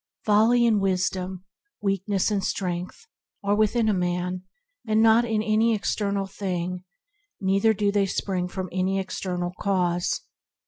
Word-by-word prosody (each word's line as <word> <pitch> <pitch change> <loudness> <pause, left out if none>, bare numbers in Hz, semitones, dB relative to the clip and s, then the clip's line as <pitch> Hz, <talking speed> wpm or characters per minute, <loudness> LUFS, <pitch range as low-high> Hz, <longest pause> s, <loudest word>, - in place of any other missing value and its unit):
Folly 225 +3 +4
and 220 -3 +3
wisdom, 185 -1 -1 0.3
weakness 195 0 0
and 200 -2 0
strength 180 - -3 0.4
are 200 0 +2
within 215 +2 +2
a 215 - +3
man 180 0 -1 0.5
and 215 0 +2
not 225 +1 +5
in 220 -2 0
any 220 +1 +3
external 200 -1 -1
thing, 180 -2 -4 0.6
neither 195 +3 +3
do 200 0 +1
they 200 -1 +2
spring 185 -1 -2
from 185 +1 -5
any 185 +1 0
external 180 -2 -3
cause. 180 -3 0
195 Hz, 135 wpm, -25 LUFS, 185-215 Hz, 0.6 s, not